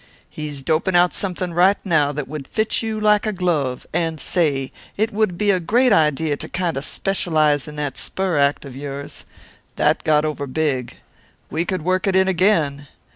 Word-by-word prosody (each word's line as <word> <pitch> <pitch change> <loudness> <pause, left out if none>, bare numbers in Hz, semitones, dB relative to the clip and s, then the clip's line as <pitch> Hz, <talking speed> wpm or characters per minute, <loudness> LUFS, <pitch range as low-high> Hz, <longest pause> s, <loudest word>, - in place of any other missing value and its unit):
He's 150 -3 -5
doping 160 +6 0
out 175 0 +4
something 180 -2 -2
right 185 +4 +4
now 155 -6 +2
that 145 -1 -5
would 145 -2 -7
fit 220 0 0
you 220 -1 -3
like 210 0 +3
a - - +1
glove 165 -9 -1
and 165 -2 -1
say, 140 -7 0 0.3
it 220 +2 0
would 205 -4 0
be 205 +2 +2
a 185 - +1
great 235 +7 +3
idea 155 -2 +2
to - - -7
kind 175 -3 -2
a' 135 - -2
specialize 155 -5 +1
in 150 - -9
that 145 -3 -4
spur 185 -5 0
act 140 +1 +1
of 135 -2 -9
yours. 140 0 -7 0.5
That - - +1
got 150 -1 +3
over 145 -2 -3
big. 130 -4 -2 0.6
We 165 +2 -1
could 185 -3 -3
work 185 +3 0
it 190 - +1
in 190 0 +4
again. 165 -7 +1
160 Hz, 185 wpm, -21 LUFS, 145-190 Hz, 0.6 s, out